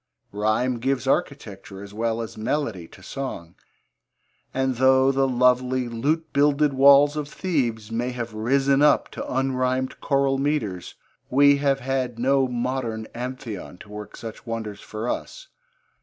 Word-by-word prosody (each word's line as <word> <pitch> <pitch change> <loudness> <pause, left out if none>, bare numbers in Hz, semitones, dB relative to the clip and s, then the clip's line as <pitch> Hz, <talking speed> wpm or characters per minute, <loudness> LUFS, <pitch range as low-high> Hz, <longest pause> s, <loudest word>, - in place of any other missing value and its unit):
Rhyme 110 +4 0
gives 135 +2 -1
architecture 105 - -3
as 100 0 -11
well 115 +1 -1
as 110 - -8
melody 110 - -2
to 90 - -16
song, 95 -10 -6 1.0
and 130 -1 -1
though 130 +1 +5
the 135 0 +2
lovely 125 0 +2
lute 145 +7 -1
builded 145 0 +3
walls 140 +2 +6
of 150 -1 -4
Thebes 120 - -2
may 120 +2 -1
have 120 -2 -5
risen 135 +5 +2
up 150 - +4
to - - -6
unrhymed 130 0 -1
choral 135 -1 +1
metres, 135 - -2 0.3
we 140 +2 +5
have 140 -1 +1
had 130 -2 -2
no 135 +2 +2
modern 120 -2 -3
Amphion 120 -7 -6
to - - -13
work 105 0 -9
such 110 -2 -8
wonders 110 -3 -5
for 110 +2 -6
us. - - -5
130 Hz, 140 wpm, -24 LUFS, 115-135 Hz, 1.0 s, walls